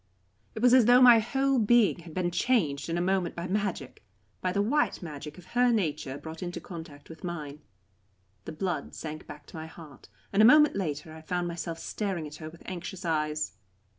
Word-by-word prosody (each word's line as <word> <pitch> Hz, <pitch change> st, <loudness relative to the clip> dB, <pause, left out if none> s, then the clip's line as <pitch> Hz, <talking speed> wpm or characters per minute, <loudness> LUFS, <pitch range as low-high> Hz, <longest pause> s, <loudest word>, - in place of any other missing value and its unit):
It 220 Hz, -, -4 dB
was 250 Hz, 0 st, +6 dB
as 255 Hz, -3 st, +7 dB
though 245 Hz, +2 st, +7 dB
my 245 Hz, -3 st, +8 dB
whole 270 Hz, +4 st, +1 dB
being 225 Hz, -3 st, +4 dB
had 165 Hz, -2 st, -12 dB
been 175 Hz, -1 st, 0 dB
changed 175 Hz, -, +1 dB
in 165 Hz, -, -1 dB
a -, -, 0 dB
moment 190 Hz, -2 st, 0 dB
by 170 Hz, -, -4 dB
magic 190 Hz, -8 st, -3 dB, 0.4 s
by 185 Hz, -, 0 dB
the 200 Hz, -, -1 dB
white 235 Hz, +1 st, +1 dB
magic 150 Hz, -2 st, -8 dB
of 180 Hz, -, -13 dB
her 245 Hz, 0 st, +4 dB
nature 155 Hz, -, -1 dB
brought 160 Hz, +2 st, -9 dB
into 175 Hz, -1 st, -4 dB
contact 160 Hz, -5 st, -10 dB
with 160 Hz, -, -12 dB
mine. 150 Hz, -4 st, -6 dB, 0.8 s
The -, -, -5 dB
blood 175 Hz, +1 st, -3 dB
sank 155 Hz, -1 st, -7 dB
back 145 Hz, 0 st, -10 dB
to -, -, -14 dB
my 160 Hz, 0 st, -6 dB
heart, 160 Hz, -4 st, -14 dB, 0.2 s
and 200 Hz, -, +4 dB
a -, -, +7 dB
moment 300 Hz, +6 st, +7 dB
later 155 Hz, -4 st, -3 dB
I 160 Hz, -, -10 dB
found 175 Hz, +2 st, -2 dB
myself 170 Hz, -1 st, -4 dB
staring 190 Hz, -2 st, -3 dB
at 150 Hz, 0 st, -9 dB
her 155 Hz, -1 st, -7 dB
with 165 Hz, +1 st, -15 dB
anxious 185 Hz, 0 st, -6 dB
eyes. 155 Hz, -1 st, -1 dB
175 Hz, 200 wpm, -28 LUFS, 155-205 Hz, 0.8 s, my